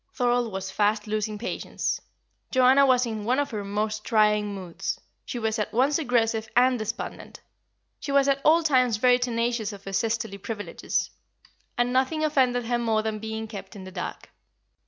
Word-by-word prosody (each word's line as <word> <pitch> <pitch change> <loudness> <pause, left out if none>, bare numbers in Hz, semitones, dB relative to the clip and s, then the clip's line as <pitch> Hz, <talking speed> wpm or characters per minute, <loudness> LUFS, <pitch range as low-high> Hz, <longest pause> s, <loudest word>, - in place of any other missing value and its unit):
Thorold 245 -2 +1
was 190 0 -4
fast 210 0 +1
losing 215 0 -2
patience. 230 - -3 0.5
Joanna 260 +2 +5
was 250 -1 +4
in 220 -2 -4
one 245 +4 +1
of 285 0 0
her 210 -2 -3
most 210 +2 -2
trying 210 -2 +2
moods; 180 -3 -4 0.3
she 245 - -5
was 220 -1 -1
at 210 - -2
once 275 +6 +2
aggressive 225 -5 +1
and 250 0 +4
despondent. 215 +1 -5 0.6
She 285 - -5
was 280 0 +4
at 275 0 +2
all 330 +2 +5
times 255 -7 +3
very 250 +2 +4
tenacious 235 -2 -1
of 200 -1 -11
her 195 - -6
sisterly 225 -1 -1
privileges, 205 +1 -3 0.7
and 245 +1 +1
nothing 265 +5 +1
offended 255 -5 +2
her 240 +1 0
more 220 -2 +1
than 220 -1 -2
being 220 0 -5
kept 210 0 -9
in 195 - -8
the 185 - -9
dark. 180 -1 -6
225 Hz, 175 wpm, -26 LUFS, 210-250 Hz, 0.7 s, Joanna